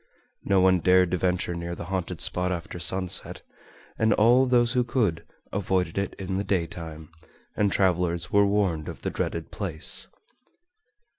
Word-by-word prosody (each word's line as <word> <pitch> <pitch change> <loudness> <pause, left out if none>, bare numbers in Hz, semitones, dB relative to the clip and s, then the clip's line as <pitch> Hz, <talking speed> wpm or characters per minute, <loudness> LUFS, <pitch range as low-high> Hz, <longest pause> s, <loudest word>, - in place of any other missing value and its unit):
No 95 -1 +3
one 95 -1 +4
dared 90 0 +3
to 90 - +1
venture 90 -1 -1
near 85 0 -5
the 85 - -7
haunted 90 0 -4
spot 90 0 0
after 90 0 -5
sunset, 90 +2 +3 0.6
and 110 0 +3
all 120 +4 +4
those 120 -1 +3
who 125 -1 +2
could, 110 -9 -1 0.3
avoided 95 -2 -1
it 100 - -3
in 95 -1 -4
the 100 - -1
daytime, 85 -4 -4 0.4
and 100 -2 +1
travelers 90 -2 0
were 100 0 +5
warned 95 -7 0
of - - -10
the - - -2
dreaded 85 -1 -4
place. 90 -6 -2
90 Hz, 155 wpm, -25 LUFS, 85-100 Hz, 0.6 s, were